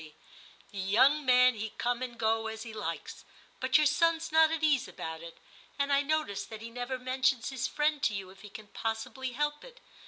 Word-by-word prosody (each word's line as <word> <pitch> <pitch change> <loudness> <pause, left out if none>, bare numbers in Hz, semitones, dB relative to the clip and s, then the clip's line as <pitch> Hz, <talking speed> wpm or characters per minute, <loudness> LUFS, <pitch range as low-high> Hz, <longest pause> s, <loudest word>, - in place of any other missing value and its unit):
The 200 - -7
young 260 +10 +3
man 250 0 +6
he 220 -1 -5
come 245 +1 -1
and 245 -2 -5
go 225 0 +1
as 220 0 -6
he 230 -2 -9
likes, 185 -6 -5 0.4
but 260 +2 +4
your 305 - +3
son's 330 +3 +2
not 320 0 +6
at 320 -1 -3
ease 285 -4 +3
about 160 0 -7
it; 170 0 -10 0.4
and 280 0 +1
I 280 - +4
notice 285 -9 -1
that 220 0 -9
he 230 - -8
never 245 +2 -4
mentions 255 0 0
his 260 -2 -2
friend 300 -1 0
to 215 - +1
you 190 -1 -6
if 190 - -17
he 210 - -11
can 210 +1 -11
possibly 230 +3 -4
help 295 +2 -2
it. - - -14
250 Hz, 210 wpm, -30 LUFS, 220-295 Hz, 0.4 s, man